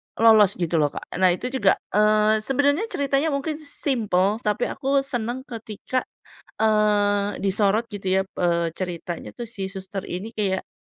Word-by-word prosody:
lolos 220 Hz, -3 st, +6 dB
gitu 170 Hz, -2 st, 0 dB
loh, 150 Hz, -, +4 dB
Kak. -, -, -5 dB, 0.2 s
Nah, 185 Hz, -, +5 dB
itu 250 Hz, +6 st, -5 dB
juga, 205 Hz, -8 st, +3 dB, 0.2 s
eee, 215 Hz, +1 st, +4 dB
sebenernya 285 Hz, -, +1 dB
ceritanya 280 Hz, -3 st, 0 dB
mungkin 300 Hz, +2 st, -3 dB
simpel, 220 Hz, -, 0 dB
tapi 215 Hz, 0 st, -1 dB
aku 275 Hz, 0 st, +1 dB
seneng 245 Hz, -1 st, -3 dB
ketika, 225 Hz, +1 st, -4 dB, 0.6 s
eee, 205 Hz, -2 st, +2 dB
disorot 200 Hz, +3 st, +1 dB
gitu 195 Hz, -4 st, -5 dB
ya, 190 Hz, -, +3 dB
eee, 170 Hz, -2 st, 0 dB
ceritanya 175 Hz, -2 st, -5 dB
tuh 240 Hz, -, -7 dB
si 195 Hz, -4 st, -5 dB
suster 190 Hz, 0 st, -6 dB
ini 205 Hz, +6 st, -6 dB
kayak 195 Hz, -3 st, -1 dB
210 Hz, 150 wpm, -24 LUFS, 190-245 Hz, 0.6 s, lolos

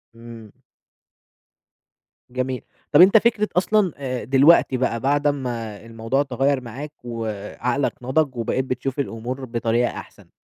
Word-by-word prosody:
إمم. 115 Hz, -2 st, -12 dB, 1.8 s
جميل، 130 Hz, 0 st, -3 dB, 0.3 s
طب، -, -, +7 dB
أنت 195 Hz, +4 st, +8 dB
فكرة 220 Hz, -1 st, +2 dB
أصلًا، 195 Hz, 0 st, +2 dB
آآ، 130 Hz, -3 st, -4 dB
دلوقتي 135 Hz, +1 st, +5 dB
بقى، 120 Hz, -2 st, 0 dB
بعد 145 Hz, +3 st, +1 dB
أما 120 Hz, -7 st, -3 dB
الموضوع 115 Hz, +5 st, -1 dB
تغيَّر 135 Hz, -1 st, 0 dB
معاك، 130 Hz, +5 st, -8 dB
وعقلك 115 Hz, +3 st, -3 dB
نضِج، 130 Hz, +2 st, 0 dB
وبقيت 120 Hz, +3 st, -1 dB
بتشوف 130 Hz, +2 st, -3 dB
الأمور 125 Hz, +1 st, -4 dB
بطريقة 120 Hz, 0 st, 0 dB
أحسن، -, -, -11 dB
130 Hz, 120 wpm, -22 LUFS, 115-140 Hz, 1.8 s, أنت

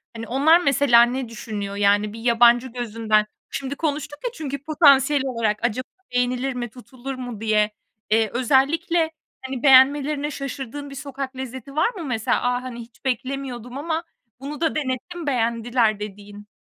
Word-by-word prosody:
Hani, 230 Hz, 0 st, -6 dB
onlar 295 Hz, +7 st, +5 dB
mesela 275 Hz, -5 st, +5 dB
ne 245 Hz, 0 st, -2 dB
düşünüyor? 210 Hz, -3 st, -5 dB
Yani, 205 Hz, +1 st, +2 dB
bir 225 Hz, -, -8 dB
yabancı 240 Hz, +1 st, +4 dB
gözünden 225 Hz, -3 st, 0 dB, 0.2 s
şimdi 275 Hz, 0 st, -4 dB
konuştuk 290 Hz, -1 st, -3 dB
ya -, -, 0 dB
çünkü 280 Hz, -, -5 dB
potansiyel 285 Hz, -2 st, +4 dB
olarak 230 Hz, -5 st, -1 dB
acaba 240 Hz, +2 st, -1 dB, 0.3 s
beğenilir 250 Hz, +2 st, 0 dB
mi, 240 Hz, -1 st, -4 dB
tutulur 255 Hz, +2 st, -8 dB
mu 245 Hz, -4 st, -7 dB
diye. 215 Hz, -1 st, +2 dB, 0.4 s
Eee, 220 Hz, 0 st, +3 dB
özellikle, 320 Hz, -, +2 dB, 0.3 s
hani, 260 Hz, -1 st, -6 dB
beğenmelerine 285 Hz, +2 st, +5 dB
şaşırdığın 275 Hz, 0 st, -6 dB
bir 275 Hz, -, -9 dB
sokak 275 Hz, -1 st, -6 dB
lezzeti 260 Hz, +1 st, -7 dB
var 315 Hz, -, +3 dB
mı 350 Hz, -, -6 dB
mesela? 225 Hz, -4 st, 0 dB
"A, 245 Hz, 0 st, +1 dB
hani, 250 Hz, -2 st, -7 dB
hiç 235 Hz, +2 st, -13 dB
beklemiyordum 255 Hz, -1 st, -3 dB
ama 320 Hz, +3 st, -2 dB, 0.4 s
bunu 290 Hz, +4 st, -7 dB
da 325 Hz, -, +1 dB
denettim, 305 Hz, +4 st, -3 dB
beğendiler." 230 Hz, -3 st, +1 dB
dediğin. 205 Hz, 0 st, -9 dB
255 Hz, 150 wpm, -23 LUFS, 230-280 Hz, 0.4 s, onlar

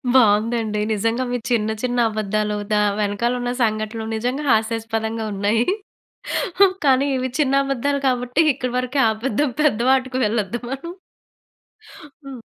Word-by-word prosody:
బావుందండి. 220 Hz, -1 st, +3 dB
నిజంగా 230 Hz, +4 st, 0 dB
మీ 245 Hz, -, 0 dB
చిన్న, 220 Hz, -2 st, +1 dB
చిన్న 245 Hz, -1 st, -1 dB
అబద్దాలు, 215 Hz, 0 st, -1 dB, 0.2 s
దా 210 Hz, -, +3 dB, 0.2 s
వెనకాలున్న 235 Hz, +4 st, -1 dB
సంఘటనలు 215 Hz, 0 st, -2 dB
నిజంగా 250 Hz, +6 st, -2 dB
హాస్యాస్పదంగా 225 Hz, 0 st, -1 dB
ఉన్నాయి. 205 Hz, +4 st, +1 dB, 1.2 s
కానీ, 270 Hz, 0 st, +4 dB
ఇవి 260 Hz, 0 st, -2 dB
చిన్న 275 Hz, -3 st, +2 dB
అబద్దాలు 275 Hz, +1 st, -1 dB
కాబట్టి 250 Hz, +3 st, +1 dB
ఇక్కడి 250 Hz, -1 st, -4 dB
వరకు 255 Hz, +2 st, -2 dB
ఆపేద్దాం. 245 Hz, +5 st, -1 dB
పెద్ద 280 Hz, -8 st, +2 dB
వాటికి 260 Hz, -1 st, +1 dB
వెళ్ళొద్దు 215 Hz, +1 st, -1 dB
మనం. 275 Hz, +6 st, -5 dB, 1.3 s
హ్మ్. 265 Hz, -3 st, -8 dB
235 Hz, 120 wpm, -21 LUFS, 215-255 Hz, 1.3 s, కానీ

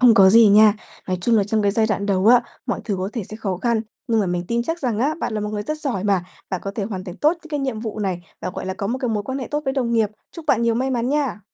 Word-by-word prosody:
không 245 Hz, -3 st, +7 dB
có 190 Hz, -2 st, +7 dB
gì 225 Hz, 0 st, +7 dB
nha. 210 Hz, +1 st, +7 dB, 0.3 s
Nói 185 Hz, -1 st, 0 dB
chung 230 Hz, +3 st, +3 dB
là 200 Hz, -, +3 dB
trong 215 Hz, +1 st, 0 dB
cái 200 Hz, -, +3 dB
giai 220 Hz, +1 st, +2 dB
đoạn 200 Hz, -1 st, -1 dB
đầu 195 Hz, 0 st, +1 dB
á, 240 Hz, +1 st, +7 dB, 0.2 s
mọi 245 Hz, -, -2 dB
thứ 205 Hz, -4 st, -1 dB
có 185 Hz, +1 st, -2 dB
thể 230 Hz, -, -3 dB
sẽ 215 Hz, -, -7 dB
khó 195 Hz, -5 st, -2 dB
khăn. 230 Hz, +3 st, +1 dB, 0.3 s
Nhưng 225 Hz, -1 st, +3 dB
mà 200 Hz, -, 0 dB
mình 175 Hz, 0 st, -2 dB
tin 235 Hz, 0 st, +1 dB
chắc 325 Hz, +6 st, -3 dB
rằng 240 Hz, -7 st, -1 dB
á 290 Hz, +6 st, +1 dB
bạn 220 Hz, -, -2 dB
là 215 Hz, -, -1 dB
một 210 Hz, -, -2 dB
người 210 Hz, -1 st, -3 dB
rất 305 Hz, +6 st, -4 dB
giỏi 240 Hz, -, -2 dB
mà, 195 Hz, -3 st, +2 dB, 0.3 s
bạn 185 Hz, -, -2 dB
có 195 Hz, -, -2 dB
thể 205 Hz, -, -2 dB
hoàn 195 Hz, -3 st, -5 dB
thành 180 Hz, -1 st, -8 dB
tốt 305 Hz, +3 st, +3 dB
những 330 Hz, -2 st, -12 dB
cái 295 Hz, -2 st, -1 dB
nhiệm 255 Hz, -5 st, -2 dB
vụ 220 Hz, -1 st, -5 dB
này, 190 Hz, -4 st, -2 dB, 0.2 s
và, 185 Hz, -, -3 dB
gọi -, -, -6 dB
là, 190 Hz, -, -2 dB
có 200 Hz, -, -3 dB
một 250 Hz, +4 st, -2 dB
cái 250 Hz, -3 st, -2 dB
mối 210 Hz, -2 st, -1 dB
quan 265 Hz, +5 st, -4 dB
hệ 260 Hz, -, -5 dB
tốt 295 Hz, 0 st, 0 dB
với 270 Hz, -, 0 dB
đồng 245 Hz, -4 st, -1 dB
nghiệp. 220 Hz, -3 st, +2 dB, 0.2 s
Chúc 330 Hz, -3 st, -9 dB
bạn 235 Hz, -5 st, +3 dB
nhiều 230 Hz, -1 st, +2 dB
may 260 Hz, +3 st, 0 dB
mắn 245 Hz, 0 st, 0 dB
nha! 280 Hz, -7 st, 0 dB
220 Hz, 335 wpm, -22 LUFS, 200-250 Hz, 0.3 s, không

